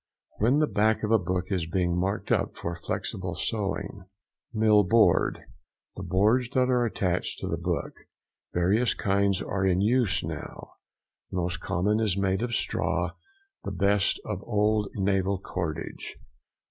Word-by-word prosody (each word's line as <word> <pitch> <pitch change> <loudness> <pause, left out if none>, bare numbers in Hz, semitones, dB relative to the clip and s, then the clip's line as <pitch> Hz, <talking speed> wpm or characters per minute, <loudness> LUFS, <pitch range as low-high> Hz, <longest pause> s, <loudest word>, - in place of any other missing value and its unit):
—When 120 +7 +3
the 155 - +4
back 110 -4 +1
of 105 - 0
a 115 - +5
book 90 +1 -2
is 90 -4 -1
being 90 0 0
marked 95 +4 -2 0.3
for 85 - -4
flexible 90 +1 -4
sewing. 100 -1 -3 0.5
MILL 110 -2 +4
BOARD.—The 110 +4 0
boards 110 +6 +2
that 130 0 +3
are 125 -1 +3
attached 90 -5 -1
to - - -5
the - - -2
book. - - -2 0.6
Various 95 +6 +2
kinds 100 -1 +1
are 100 -1 -2
in 95 -1 +2
use 110 -4 +2
now; - - -7 0.6
the - - -4
most 90 0 -1
common 105 +5 0
is 105 -4 +1
made 95 0 +1
of 120 0 -1
straw, - - 0 0.5
the - - -4
best 100 0 +2
of 105 -3 -4
old 105 -2 +1
naval 95 0 +1
cordage. 85 -5 -5
100 Hz, 145 wpm, -27 LUFS, 95-110 Hz, 0.6 s, a